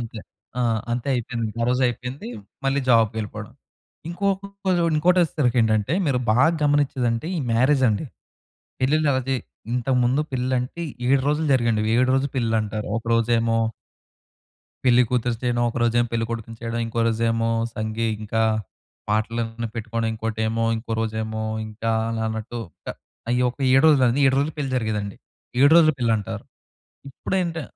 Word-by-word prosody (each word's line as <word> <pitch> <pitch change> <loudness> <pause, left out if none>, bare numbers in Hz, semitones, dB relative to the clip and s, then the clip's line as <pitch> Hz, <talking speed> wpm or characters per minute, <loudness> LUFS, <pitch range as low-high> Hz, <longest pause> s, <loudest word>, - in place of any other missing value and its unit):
అంతే. 115 -1 -6 0.4
ఆ! - - +1 0.3
అంతే 120 +3 -2
అయిపోయింది. 115 -2 -2
ఆ - - +2
రోజు 125 +1 +1
అయిపోయింది. 125 +3 -5 0.4
మళ్ళీ 135 +1 +1
జాబ్‌కెళ్ళిపోవడం. 110 -3 +1 0.6
ఇంకొకటి 195 +1 -1
చూడండి, 165 -2 +2
ఇంకోటి 180 +4 +3
వచ్చేసరికి 135 -7 +1
ఏంటంటే, 110 +3 +1
మీరు 135 -3 +2
బాగా 125 +8 +5
గమనిచ్చేదంటే, 135 -4 +1
ఈ - - -1
మ్యారేజ్ 130 +4 +3
అండి. 105 +6 0 0.8
పెళ్లిళ్లు 150 +3 +2
అయితే 130 0 0 0.4
ఇంతకు 125 +1 +1
ముందు 130 +5 +2
పెళ్లంటే, 130 +5 -1 0.3
7 135 0 +4
రోజులు 150 +2 +1
జరిగేయండి 115 -4 +2
అవి, 110 - 0
7 130 +1 +3
రోజుల 135 0 0
పెళ్లంటారు. 110 -3 -1
ఒక - - -21
రోజేమో... 115 0 +2 1.3
పెళ్లి 125 -1 +5
కూతురిని 120 -2 0
చేయడం. 120 -1 +1
ఒక - - -10
రోజేమో, 120 0 +2
పెళ్ళికొడుకుని 115 0 -3
చేయడం, 115 0 -3
ఇంకో 115 +1 -5
రోజేమో 115 0 0 0.3
సంగీ, 110 +1 -2 0.2
ఇంకా 110 +1 0 0.7
పాటలన్నీ 115 +2 -1
పెట్టుకోవడం. 115 0 -2
ఇంకోటేమో, 110 0 -1
ఇంకో 115 0 -6
రోజేమో, 110 0 -3 0.2
ఇంకా 110 +1 -3 0.2
అలా 115 -1 -2
అన్నట్టు. 110 +2 -5 0.2
ట్టా - - -5 0.4
అయ్యొక 125 +1 +1
7 135 +1 +5
రోజులది, 135 -4 +4
7 135 - +3
రోజులు 145 +3 0
పెళ్లి 140 -2 -2
జరిగేదండి. 105 -4 -2 0.4
7 140 +1 +7
రోజుల 160 -2 +6
పెళ్లంటారు. 115 -2 -1 0.7
ఇప్పుడేంటి 170 +3 -2
120 Hz, 140 wpm, -23 LUFS, 115-135 Hz, 1.3 s, 7